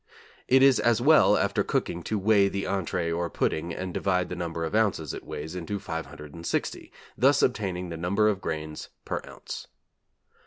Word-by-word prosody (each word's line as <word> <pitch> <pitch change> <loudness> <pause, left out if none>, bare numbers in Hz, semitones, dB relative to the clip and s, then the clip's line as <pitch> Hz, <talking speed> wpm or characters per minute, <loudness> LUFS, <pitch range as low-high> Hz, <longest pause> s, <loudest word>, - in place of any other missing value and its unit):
It 130 +1 +5
is 135 -2 +6
as 120 -1 +3
well 155 +6 +6
after - - +1
cooking 85 - -1
to 110 - -1
weight 100 0 +4
the 100 0 -2
entree 90 -3 -1
or 85 +1 -1
pudding 85 +2 -1
and 90 +1 -5
divide 90 -2 0
the 90 - -4
number 85 -1 -3
of 80 - -5
ounces 100 - +1
it - - -7
weighs 80 +3 -6
into 90 +3 -3
560, 80 -3 -5 0.2
thus 140 +2 +4
obtaining 95 -7 -1
the 85 - -5
number 100 +6 +2
of 100 -3 0
grains 75 -1 -5 0.2
per - - -2
ounce. - - -8
90 Hz, 170 wpm, -27 LUFS, 85-105 Hz, 0.2 s, is